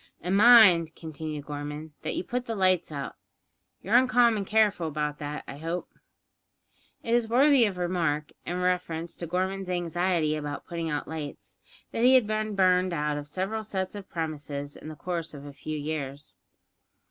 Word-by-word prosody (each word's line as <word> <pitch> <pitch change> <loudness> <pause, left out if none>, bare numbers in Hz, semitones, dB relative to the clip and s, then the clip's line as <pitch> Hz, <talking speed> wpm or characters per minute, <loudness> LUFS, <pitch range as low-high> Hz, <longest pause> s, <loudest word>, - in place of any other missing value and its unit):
"And 180 +3 -1
mind," 200 -8 +7
continued 155 -2 -6
Gorman, 150 +1 -6
"that - - -3
you - - -2
put 250 +5 -3
the 225 - -2
lights 185 -4 +2
out. 140 -2 -5 0.7
You're 200 - -3
uncommon 240 -5 +4
careful 210 -5 +2
about 150 -1 -3
that, 150 0 -5
I 140 - -8
hope?" 165 +3 -4 1.1
It 230 - -1
is 235 -2 +2
worthy 265 +1 +5
of 195 -4 -2
remark, 165 -4 -1
in 180 +1 -3
reference 175 -2 -1
to 170 - -5
Gorman's 185 +2 -2
anxiety 175 -2 0
about 145 -1 -5
putting 170 -1 -4
out 150 -1 -3
lights, 155 -3 -7 0.3
that 230 - -1
he 255 +1 +7
had 255 -4 +5
been 215 0 -2
burned 185 -1 +3
out 150 -2 -1
of 145 0 -5
several 190 +8 -3
sets 190 -3 -3
of 200 -2 -9
premises 145 -3 -4
in - - -11
the 155 - -7
course 170 0 -4
of 140 0 -10
a 145 - -9
few 155 +2 -5
years. 145 -1 -5
175 Hz, 170 wpm, -27 LUFS, 150-195 Hz, 1.1 s, mind